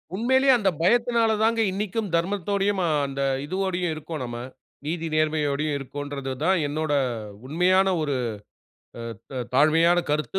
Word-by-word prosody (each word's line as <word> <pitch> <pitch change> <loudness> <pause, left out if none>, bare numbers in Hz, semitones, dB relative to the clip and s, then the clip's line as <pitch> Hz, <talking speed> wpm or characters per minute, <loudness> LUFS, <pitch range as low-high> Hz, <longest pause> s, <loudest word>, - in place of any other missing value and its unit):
உண்மையிலயே 260 +5 +3
அந்த 205 -4 +2
பயத்தினால 235 +3 +3
தாங்க 225 0 +2
இன்னைக்கும் 205 +1 -2
தர்மத்தோடையும், 195 +2 0
அ - - +1 0.2
அந்த 135 0 -4 0.2
இதுவோடையும் 180 0 -1
இருக்கோம் 155 -1 -6
நம்ம. 120 -1 -6 0.5
நீதி 165 0 -2
நேர்மையோடையும் 150 -1 0
இருக்கோம்ன்றத 140 0 -5
தான் 190 +2 +3
என்னோட 155 0 -2 0.5
உண்மையான 185 +5 +3
ஒரு 145 -3 -1 1.2
த 130 -2 -2
தாழ்மையான 165 +5 +4
கருத்து, 155 +5 -1
170 Hz, 120 wpm, -25 LUFS, 150-200 Hz, 1.2 s, தாழ்மையான